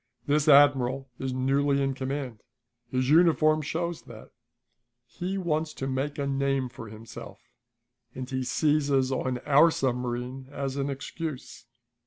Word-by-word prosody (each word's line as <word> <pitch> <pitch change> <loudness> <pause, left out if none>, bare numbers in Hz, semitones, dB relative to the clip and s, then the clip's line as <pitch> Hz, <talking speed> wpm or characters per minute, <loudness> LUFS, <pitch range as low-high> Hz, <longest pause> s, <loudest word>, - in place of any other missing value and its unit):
This 150 +1 +1
admiral 135 -2 +4
is 130 0 -2
newly 140 +2 +1
in 135 -1 0
command; 130 -3 -4 0.5
his 130 +1 0
uniform 155 -2 +4
shows 170 +3 -3
that. - - -12 0.7
He 185 +6 -4
wants 160 -4 -1
to 135 - -4
make 135 +2 -2
a 140 - -1
name 135 -1 0
for 120 -2 -10
himself, 110 +1 -10 0.8
and 130 -1 -5
he 130 -1 -2
seizes 140 -1 +1
on 130 -1 -1
our 150 +3 +6
submarine 125 -1 -3
as 140 -2 -4
an 140 0 -1
excuse. 135 -3 -6
135 Hz, 135 wpm, -27 LUFS, 130-150 Hz, 0.8 s, our